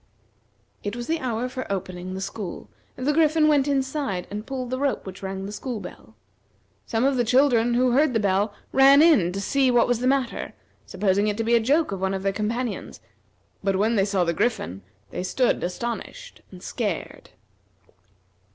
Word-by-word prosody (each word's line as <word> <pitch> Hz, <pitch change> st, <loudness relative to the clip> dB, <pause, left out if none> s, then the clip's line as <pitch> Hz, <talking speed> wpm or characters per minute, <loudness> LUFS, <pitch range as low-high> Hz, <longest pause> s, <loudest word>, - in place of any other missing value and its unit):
It 205 Hz, +2 st, -3 dB
was 240 Hz, 0 st, -5 dB
the 325 Hz, +4 st, -1 dB
hour 245 Hz, -3 st, -2 dB
for 255 Hz, -3 st, -6 dB
opening 185 Hz, -1 st, -4 dB
the 190 Hz, -, -5 dB
school, 195 Hz, -1 st, -6 dB, 0.3 s
and 255 Hz, -, -5 dB
the 295 Hz, -, +2 dB
Griffin 310 Hz, 0 st, +4 dB
went 290 Hz, -2 st, +3 dB
inside 270 Hz, -9 st, -1 dB
and 210 Hz, +2 st, -6 dB
pulled 255 Hz, -2 st, -4 dB
the 255 Hz, -, -2 dB
rope 280 Hz, -1 st, -1 dB
which 190 Hz, -1 st, -9 dB
rang 190 Hz, 0 st, -5 dB
the 200 Hz, -, -6 dB
school 235 Hz, +2 st, -5 dB
bell. 145 Hz, -, -11 dB, 0.7 s
Some 225 Hz, +1 st, 0 dB
of 275 Hz, -1 st, +2 dB
the 245 Hz, -, +3 dB
children 240 Hz, -1 st, +3 dB
who 250 Hz, +1 st, +3 dB
heard 280 Hz, +2 st, +3 dB
the -, -, +3 dB
bell 200 Hz, +1 st, +1 dB, 0.2 s
ran 275 Hz, +2 st, +7 dB
in 280 Hz, -, +5 dB
to 195 Hz, -, -4 dB
see 265 Hz, +6 st, +2 dB
what 245 Hz, -1 st, +4 dB
was 245 Hz, -2 st, +1 dB
the 250 Hz, -, 0 dB
matter, 265 Hz, -2 st, -1 dB, 0.3 s
supposing 200 Hz, +1 st, +1 dB
it 210 Hz, -1 st, -1 dB
to 225 Hz, -, -1 dB
be 230 Hz, +1 st, +1 dB
a 235 Hz, -, +6 dB
joke 285 Hz, +7 st, +2 dB
of 195 Hz, -1 st, -4 dB
one 190 Hz, 0 st, 0 dB
of 190 Hz, -, -5 dB
their 195 Hz, 0 st, 0 dB
companions; 225 Hz, +3 st, -3 dB, 0.6 s
but 195 Hz, 0 st, +1 dB
when 215 Hz, +4 st, +2 dB
they 195 Hz, -2 st, +3 dB
saw 195 Hz, -3 st, +1 dB
the 170 Hz, -1 st, 0 dB
Griffin 160 Hz, -, -1 dB, 0.3 s
they -, -, -4 dB
stood 245 Hz, +7 st, 0 dB
astonished, 235 Hz, -, -5 dB
and -, -, -13 dB
scared. -, -, -4 dB
230 Hz, 195 wpm, -24 LUFS, 195-265 Hz, 0.7 s, ran